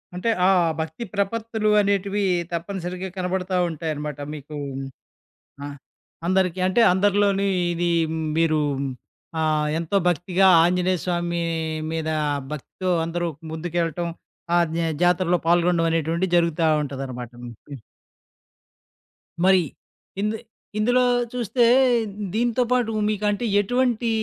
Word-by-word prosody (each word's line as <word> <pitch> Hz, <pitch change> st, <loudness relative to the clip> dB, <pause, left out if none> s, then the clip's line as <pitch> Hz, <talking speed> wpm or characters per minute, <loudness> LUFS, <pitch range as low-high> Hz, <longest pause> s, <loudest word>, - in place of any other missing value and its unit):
అంటే, 180 Hz, +6 st, -1 dB, 0.2 s
ఆ -, -, +5 dB, 0.3 s
భక్తి 160 Hz, +8 st, -4 dB
ప్రపత్తులు 220 Hz, +2 st, -1 dB
అనేటివీ 200 Hz, 0 st, 0 dB, 0.3 s
తప్పనిసరిగా 180 Hz, +1 st, -4 dB
కనబడతా 185 Hz, 0 st, -1 dB
ఉంటాయనమాట 150 Hz, -2 st, -4 dB
మీకూ 150 Hz, 0 st, -8 dB, 1.1 s
ఆహ్, 145 Hz, 0 st, -6 dB, 0.5 s
అందరికి. 185 Hz, -1 st, +1 dB
అంటే, 185 Hz, +6 st, +3 dB
అందరిలోనీ 200 Hz, 0 st, +2 dB, 0.3 s
ఇదీ 170 Hz, 0 st, 0 dB, 0.5 s
మీరూ 160 Hz, -2 st, +3 dB, 0.8 s
ఆహ్, 155 Hz, -1 st, +1 dB
ఎంతో 170 Hz, +4 st, 0 dB
భక్తిగా 180 Hz, +3 st, +2 dB, 0.2 s
ఆంజనేయ 180 Hz, +1 st, +1 dB
స్వామీ 175 Hz, -1 st, -1 dB, 0.5 s
మీదా 160 Hz, -1 st, -1 dB, 0.4 s
భక్తితో 185 Hz, +5 st, -5 dB, 0.2 s
అందరూ 175 Hz, +1 st, -2 dB, 0.2 s
ముందుకెళ్ళటం, 170 Hz, +1 st, -2 dB, 0.5 s
ఆ -, -, +5 dB, 0.2 s
న్యా 165 Hz, -1 st, 0 dB
జాతరలో 180 Hz, 0 st, +3 dB
పాల్గొనడవనేటువంటిది 170 Hz, 0 st, +2 dB
జరుగుతా 170 Hz, -1 st, +2 dB, 0.2 s
ఉంటుందనమాట. 130 Hz, -4 st, -6 dB
హ్మ్. 120 Hz, -, -7 dB, 0.2 s
హు. 140 Hz, -5 st, -8 dB, 1.6 s
మరి 190 Hz, -1 st, +6 dB, 0.6 s
ఇందె 210 Hz, +1 st, -1 dB, 0.4 s
ఇందులో 245 Hz, +4 st, +3 dB, 0.3 s
చూస్తే 245 Hz, 0 st, 0 dB, 0.7 s
దీనితో 240 Hz, +2 st, +1 dB
పాటూ 245 Hz, -3 st, +2 dB, 0.2 s
మీకంటే, 210 Hz, +2 st, 0 dB
ఎటువంటీ 240 Hz, +1 st, +1 dB
180 Hz, 100 wpm, -23 LUFS, 165-200 Hz, 1.6 s, మరి